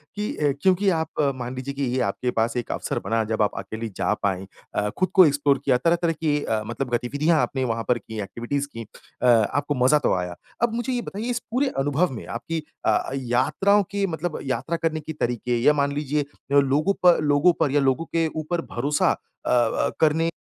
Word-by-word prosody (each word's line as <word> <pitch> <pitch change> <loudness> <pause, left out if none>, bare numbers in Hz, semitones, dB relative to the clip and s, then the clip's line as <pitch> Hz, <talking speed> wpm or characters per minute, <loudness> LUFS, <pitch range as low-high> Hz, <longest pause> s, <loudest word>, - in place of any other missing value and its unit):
कि 210 +1 -2
अ, 145 -1 +2
क्योंकि 190 +3 +3
आप 160 -3 -1
मान 125 0 -5
लीजिए 130 +2 -5
कि 140 0 -3
ये - - +1
आपके 110 +5 -1
पास 115 +1 0
एक 120 - -3
अवसर - - -2
बना 115 0 +1
जब 110 - 0
आप 105 - +1
अकेली 110 +4 -5
जा - - +1
पाईं 95 -1 0 0.3
अ, 105 0 +1
ख़ुद 185 - -1
को 185 -2 +8
एक्सप्लोर 140 -2 +2
किया 130 -3 +4
तरह 165 +7 +2
तरह 170 -1 +2
की 150 -2 0
अ, 110 -1 -1
मतलब 120 +4 -4
गतिविधियाँ 145 +7 +1
आपने 135 -1 -1
वहाँ 115 -2 -1
पर 125 - +3
कीं, 110 -1 -7
एक्टिविटीज 120 +8 -3
कीं 115 0 -6 0.4
अ, 125 - +3
आपको 130 +6 +3
मज़ा 150 +4 +5
तो - - +1
आया। 90 -1 -3 0.3
अब 235 -1 +2
मुझे 240 +2 -2
ये 245 - -1
बताइए 220 +2 -5
इस 240 -1 0
पूरे 265 +4 +1
अनुभव 145 +5 +1
में - - -7
आपकी 155 +7 -4 0.2
अ, - - +2
यात्राओं 135 +11 +2
की 200 0 0
मतलब 165 -1 -3
यात्रा 135 +5 -2
करने 165 -1 -1
के 155 +1 -7
तरीके 120 0 0
या 150 - +6
मान 140 0 +1
लीजिए 145 0 -1 0.4
लोगों 145 +8 +2
पर 175 -3 +6
लोगों 145 +4 +4
पर 140 - +2
या 145 - +3
लोगों 160 +5 -4
के 165 -1 +3
ऊपर 160 +2 -2
भरोसा 145 +5 +2 0.3
अ - - -2
अ, 120 -2 +2
करने 160 +1 +3
145 Hz, 210 wpm, -24 LUFS, 120-165 Hz, 0.4 s, को